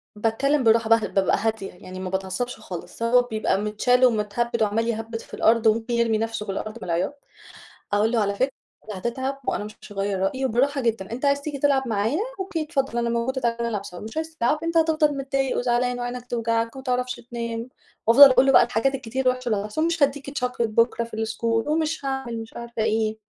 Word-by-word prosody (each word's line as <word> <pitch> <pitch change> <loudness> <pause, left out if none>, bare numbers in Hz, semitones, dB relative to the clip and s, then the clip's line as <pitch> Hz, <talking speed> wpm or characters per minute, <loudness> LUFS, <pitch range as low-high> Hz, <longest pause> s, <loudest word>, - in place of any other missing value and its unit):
بتكلم 255 +6 +1
بالراحة 225 0 +4
باهدى 225 -2 +4
بابقى 190 0 +2
هادية 220 -3 -2
يعني 185 +1 -10
ما 185 -1 -4
باتعصبش 190 +6 -3
خالص، 180 +5 -7
هو 245 +2 +5
بيبقى 215 -4 -1
متشال 245 +4 +3
ومتهبّد 230 +1 +1
وعمال 225 +2 0
يهبّد 225 0 -3
في - - -18
الأرض 225 0 +3
وممكن 225 +2 +1
يرمي 235 -2 +2
نَفْسه 225 -1 -3
في 195 - -3
الأرض 215 +3 -5
من - - -10
العياط، 180 +11 -2 0.7
أقول 215 +3 +3
له 235 - +2
على 200 -1 0
فكرة 260 +6 +1 0.4
هتتعب 260 +7 -3
وأنا - - -1
مش 210 0 -9
هغيّر 195 -1 -2
رأيي 260 +8 0
وبالراحة 270 +4 +1
جدًا 225 -4 -1
أنت 255 +5 -3
عايز 280 0 +2
تيجي 285 -2 -5
تلعب 270 -2 +2
معايا؟ 225 - 0 0.2
أوكي 370 -4 -2
اتفضل 275 -6 -2
أنا 235 0 0
موجودة 245 +3 -1
تعالَ 235 -1 0
نلعب 230 -4 -1
مش 215 - -8
عايز 320 0 -4
تلعب؟ 295 +5 +1
أنت 330 0 0
هتفضل 310 -3 +3
متضايق 270 -1 -1
وزعلان 245 0 0
وعينك 245 0 -4
هتوجعك، 230 -1 -1
وما 265 - -8
تعرفش 250 -1 -1
تنام، 235 0 -5 0.4
وأفضل 275 +5 +10
أقول 255 +1 +5
له 270 - +5
بقى - - +7
الحاجات 270 +4 0
الكتير 260 +1 -4
الوحشة 255 -1 +1
اللي 215 - +1
هتحصل 215 +10 -1
مش 335 -2 +1
هادّيك 280 0 0 0.2
chocolate 250 - -4
بكرا 230 +1 +1
في 230 - -9
الschool 225 +1 -1
ومش 310 -1 -1
هاعمل 265 -4 -3
مش 225 - -11
عارفة 235 -2 -4
إيه. 220 0 0
235 Hz, 200 wpm, -24 LUFS, 220-265 Hz, 0.7 s, وأفضل